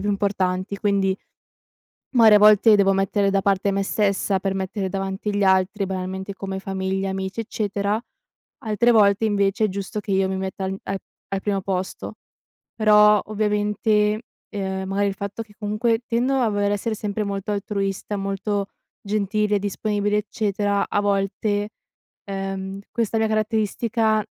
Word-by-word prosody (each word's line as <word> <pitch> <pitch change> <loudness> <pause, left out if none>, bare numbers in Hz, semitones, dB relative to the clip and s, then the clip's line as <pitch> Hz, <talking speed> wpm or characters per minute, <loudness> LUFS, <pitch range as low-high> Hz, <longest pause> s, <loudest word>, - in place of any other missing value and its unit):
più 205 - -2
importanti, 195 -1 -1
quindi 195 -2 +1 1.0
magari 220 -3 +8
a - - +6
volte 210 +1 +7
devo 195 -1 +4
mettere 195 +1 +1
da 195 0 +2
parte 200 0 +1
me 195 0 0
stessa, 195 -1 +1
per 195 0 -1
mettere 190 0 -3
davanti 195 +1 -3
gli 205 - +1
altri, 190 +1 +2
banalmente, 190 +1 -4
come 190 -1 -5
famiglia, 190 0 -2
amici, 190 +3 -3
eccetera. 205 0 -2 0.6
Altre 225 +2 +2
volte, 205 -1 +4
invece, 200 +1 +1
è 215 - +2
giusto 200 +2 -4
che 205 - -8
io 190 0 +2
mi 190 - -2
metta 190 0 -4
an 190 0 -2
a 195 - -2 0.3
al 195 0 -2
primo 200 -2 0
posto. 190 -1 -4 0.6
Però, 210 -1 +6
ovviamente, 210 0 +1 0.3
ehm, 190 -2 -3
magari 200 +1 +1
il 200 - -1
fatto 200 +3 -5
che 210 - -21
comunque 225 +2 0
tendo 250 +3 +1
a 245 -4 +2
voler 205 0 0
essere 220 +2 -2
sempre 210 0 -3
molto 200 0 -3
altruista, 200 0 -2
molto 195 +1 -2 0.4
gentile, 210 0 0
disponibile, 205 +1 -1
eccetera, 205 -1 0
a 205 - +1
volte, 205 +1 0 0.6
ehm, 195 0 -4
questa 225 -1 -1
mia 220 - +2
caratteristica 215 0 +1
200 Hz, 150 wpm, -23 LUFS, 195-210 Hz, 1.0 s, magari